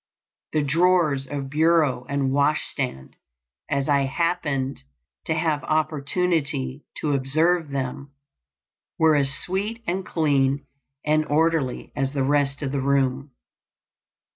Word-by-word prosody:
The 155 Hz, -1 st, +2 dB
drawers 155 Hz, -2 st, +2 dB
of 135 Hz, -1 st, -5 dB
bureau 155 Hz, -5 st, +2 dB
and 140 Hz, -2 st, 0 dB
wash 145 Hz, +2 st, +2 dB
stand, 125 Hz, -, -4 dB, 0.5 s
as 140 Hz, -2 st, 0 dB
I 140 Hz, -2 st, +3 dB
happened 145 Hz, -3 st, -1 dB, 0.4 s
to 160 Hz, -, 0 dB
have 155 Hz, -2 st, 0 dB
opportunity 150 Hz, -3 st, -1 dB
to 150 Hz, -2 st, -1 dB
observe 155 Hz, +5 st, +1 dB
them, 140 Hz, 0 st, -4 dB, 0.9 s
were 160 Hz, -1 st, +4 dB
as 140 Hz, -2 st, +2 dB
sweet 200 Hz, -, -2 dB
and 185 Hz, +3 st, -1 dB
clean 140 Hz, -5 st, +1 dB, 0.4 s
and 155 Hz, +1 st, +3 dB
orderly 155 Hz, -3 st, 0 dB
as 135 Hz, 0 st, -1 dB
the 140 Hz, -2 st, 0 dB
rest 140 Hz, +1 st, +1 dB
of 135 Hz, -, -2 dB
the 140 Hz, -1 st, -1 dB
room. 135 Hz, 0 st, +1 dB
145 Hz, 120 wpm, -24 LUFS, 135-160 Hz, 0.9 s, were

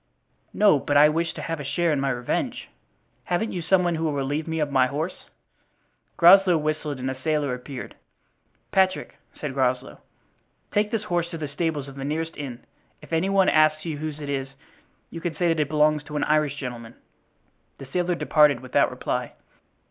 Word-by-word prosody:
"No, 205 Hz, -9 st, +4 dB
but 145 Hz, +1 st, +1 dB
I 150 Hz, +1 st, +7 dB
wish 165 Hz, +2 st, 0 dB
to -, -, -7 dB
have 165 Hz, -1 st, -3 dB
a -, -, -5 dB
share 170 Hz, +4 st, 0 dB
in 145 Hz, -, +1 dB
my 135 Hz, 0 st, 0 dB
revenge. 120 Hz, -2 st, -2 dB, 0.6 s
Haven't 180 Hz, +6 st, -1 dB
you 180 Hz, -, -3 dB
some 180 Hz, +2 st, +3 dB
one 175 Hz, -1 st, +1 dB
who 160 Hz, 0 st, -2 dB
will 155 Hz, -, 0 dB
relieve 145 Hz, +3 st, -2 dB
me 160 Hz, 0 st, -2 dB
of 150 Hz, -2 st, -1 dB
my 130 Hz, -2 st, +4 dB
horse?" 155 Hz, +7 st, -4 dB, 0.9 s
Groslow 180 Hz, 0 st, +7 dB
whistled 155 Hz, -1 st, -2 dB
and 130 Hz, +1 st, -3 dB
a 130 Hz, 0 st, -9 dB
sailor 150 Hz, -3 st, 0 dB
appeared. 125 Hz, +1 st, -7 dB, 0.8 s
"Patrick," 190 Hz, -1 st, +1 dB, 0.2 s
said 145 Hz, -3 st, -4 dB
Groslow, 130 Hz, -1 st, -1 dB, 0.7 s
"take 210 Hz, 0 st, +1 dB
this 225 Hz, -2 st, -2 dB
horse 175 Hz, -4 st, -1 dB
to 170 Hz, -, -6 dB
the 155 Hz, -2 st, -4 dB
stables 145 Hz, -1 st, -2 dB
of 135 Hz, 0 st, -11 dB
the 135 Hz, -, -5 dB
nearest 160 Hz, +3 st, -3 dB
inn. 130 Hz, -4 st, -7 dB, 0.4 s
If -, -, -10 dB
any 165 Hz, +4 st, +1 dB
one 195 Hz, -1 st, +3 dB
asks 155 Hz, 0 st, +3 dB
you 155 Hz, -3 st, -4 dB
whose 155 Hz, -1 st, -5 dB
it 145 Hz, -, -6 dB
is 135 Hz, -1 st, -2 dB, 0.6 s
you 165 Hz, -, -7 dB
can 170 Hz, -2 st, -3 dB
say 175 Hz, -1 st, +1 dB
that 165 Hz, -1 st, +1 dB
it 150 Hz, -2 st, 0 dB
belongs 150 Hz, 0 st, +3 dB
to 150 Hz, -, -8 dB
an 150 Hz, -, 0 dB
Irish 150 Hz, -2 st, +1 dB
gentleman." 120 Hz, -4 st, -7 dB, 0.8 s
The 135 Hz, -, -9 dB
sailor 175 Hz, +6 st, -1 dB
departed 150 Hz, -6 st, +3 dB
without 130 Hz, -1 st, +2 dB
reply. -, -, -3 dB
155 Hz, 195 wpm, -24 LUFS, 140-170 Hz, 0.9 s, I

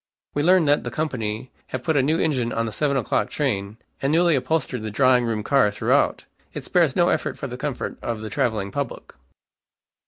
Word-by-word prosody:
We 145 Hz, -, 0 dB
learn 180 Hz, +1 st, +4 dB
that 145 Hz, 0 st, +3 dB
the -, -, -3 dB
company 125 Hz, -5 st, -3 dB, 0.2 s
have 130 Hz, -1 st, -5 dB
put 160 Hz, -, 0 dB
a 140 Hz, -, +4 dB
new 155 Hz, +5 st, +2 dB
engine 130 Hz, -7 st, 0 dB
on 115 Hz, 0 st, -1 dB
the 110 Hz, -, -4 dB
seven 140 Hz, +3 st, 0 dB
o'clock 120 Hz, -, 0 dB
train, 100 Hz, +2 st, -2 dB, 0.2 s
and 135 Hz, -, +1 dB
newly 170 Hz, 0 st, +4 dB
upholstered 135 Hz, -3 st, -1 dB
the 110 Hz, -, -4 dB
drawing 125 Hz, +2 st, +3 dB
room 110 Hz, -2 st, -2 dB
car 135 Hz, -3 st, +3 dB
throughout. 105 Hz, -, +1 dB, 0.3 s
It -, -, -5 dB
spares -, -, +2 dB
no -, -, +4 dB
effort -, -, -1 dB
for -, -, -5 dB
the -, -, -5 dB
comfort -, -, -4 dB
of 115 Hz, -2 st, -3 dB
the 110 Hz, -, -6 dB
traveling 110 Hz, -8 st, -1 dB
public." 140 Hz, -4 st, -5 dB
130 Hz, 200 wpm, -23 LUFS, 110-145 Hz, 0.3 s, learn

